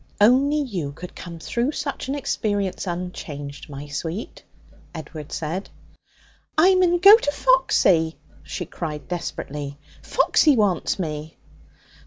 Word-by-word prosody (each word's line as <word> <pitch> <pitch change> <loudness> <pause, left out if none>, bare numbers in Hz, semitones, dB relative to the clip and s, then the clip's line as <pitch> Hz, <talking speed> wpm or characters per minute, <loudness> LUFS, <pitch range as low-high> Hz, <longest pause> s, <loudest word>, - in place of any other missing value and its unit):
'Only 260 +8 +5
you 180 - -3
could 180 +4 -10
come 170 -2 -8
through 240 - -1
such 280 -2 -4
an 270 - -1
experience 205 -9 -2
unchanged, 155 -6 -6
my 140 0 -7
sweet,' 160 +8 -5 0.5
Edward 155 -1 -8
said. 170 +5 -4 0.9
'I 365 +5 +6
mun 360 -1 +4
go 395 +4 +10
to 290 -10 -1
Foxy!' 190 - +3 0.2
she - - -5
cried 150 -4 -6
desperately. 145 -5 -5 0.2
'Foxy 300 -3 +3
wants 200 -6 +1
me.' 155 -3 -5
180 Hz, 120 wpm, -23 LUFS, -, 0.9 s, go